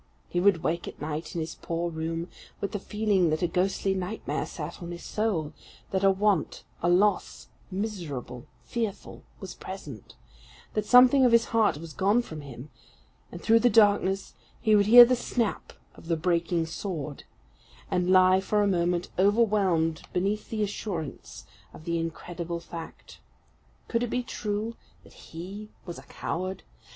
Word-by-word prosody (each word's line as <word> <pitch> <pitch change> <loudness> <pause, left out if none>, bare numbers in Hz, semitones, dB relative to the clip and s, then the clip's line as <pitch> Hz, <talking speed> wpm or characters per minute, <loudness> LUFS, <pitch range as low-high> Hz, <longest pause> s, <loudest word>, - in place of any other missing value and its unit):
He 175 - -1
would 185 -3 +3
wake 170 +1 -1
at - - -9
night 155 +2 -5
in 170 - -1
his 160 +1 -4
poor 170 +1 -2
room, 165 +1 -3 0.3
with 200 - -3
the 205 - -3
feeling 205 -4 +1
that 155 +3 -1
a - - +3
ghostly 190 +2 0
nightmare 190 +3 -3
sat - - -7
on 170 - -6
his 175 0 -7
soul; 200 -9 -1 0.4
that 190 0 0
a 195 - +6
want 195 -2 +1 0.2
a 175 - +2
loss 195 +2 +1 0.2
miserable, 175 - -5 0.2
fearful 225 - -4 0.2
was 190 - -7
present; 150 - -9 0.6
that 210 -1 -1
something 250 +3 +7
of 250 - +5
his 235 0 +5
heart 220 -9 +3
was 160 0 -9
gone 205 +5 +2
from 155 -8 -8
him; 135 0 -10 0.6
and - - -9
through 225 0 +5
the 245 - +4
darkness 205 -3 +3 0.3
he 215 -2 +3
would 200 -1 +4
hear 240 +2 +11
the 250 +1 +2
snap 235 -2 -2 0.2
of - - -15
the 165 -1 +1
breaking 170 0 0
sword, 160 -4 -5 0.7
and 180 0 +1
lie 185 0 +6
for 210 +2 +1
a - - +2
moment 175 -2 0
overwhelmed 195 -6 +2
beneath 200 +4 -1
the 215 -2 -1
assurance 195 -6 -5 0.3
of - - -12
the 170 0 -1
incredible 170 +1 -5
fact. 170 -1 -10 0.7
Could 230 - 0
it 245 - -1
be 250 +2 -1
true 215 0 -3 0.3
that - - -18
he 195 +6 -9 0.2
was 175 - -7
a - - -13
coward? 185 +2 -4
185 Hz, 165 wpm, -27 LUFS, 165-210 Hz, 0.7 s, hear